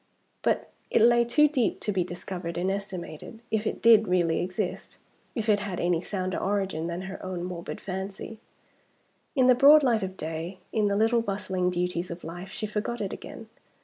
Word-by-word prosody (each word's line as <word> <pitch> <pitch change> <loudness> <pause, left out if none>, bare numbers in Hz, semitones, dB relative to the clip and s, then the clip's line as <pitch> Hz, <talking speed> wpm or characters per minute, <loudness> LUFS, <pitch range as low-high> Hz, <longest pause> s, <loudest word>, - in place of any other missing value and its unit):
But - - 0 0.2
it - - +3
lay 235 +1 +6
too 300 +6 +5
deep 265 -6 0
to 210 - 0
be 190 -3 +1
discovered 175 -1 -6
and 185 +2 0
estimated, 195 0 -6
if 220 0 0
it - - -4
did 225 -2 +7
really 175 -3 +2
exist 185 +1 -4 0.4
if 225 -2 -2
it 210 -2 +4
had 200 -3 -4
any 175 -1 +1
sounder 185 -1 -3
origin 190 -5 -1
than 170 +1 -4
her 190 +1 -7
own 185 -2 -4
morbid 175 -1 -5
fancy. 195 +3 -6 1.0
In 260 -2 +4
the 255 - +7
broad 290 +4 +7
light 235 -4 +3
of 190 0 -4
day, 160 +4 -5 0.2
in 215 -2 +2
the 200 - +1
little 225 +2 +3
bustling 190 -4 -1
duties 180 0 -2
of 170 0 -7
life, 175 +3 -7
she 215 - -4
forgot 215 +3 -3
it 200 -3 -3
again. 225 - -9
190 Hz, 185 wpm, -27 LUFS, 180-220 Hz, 1.0 s, did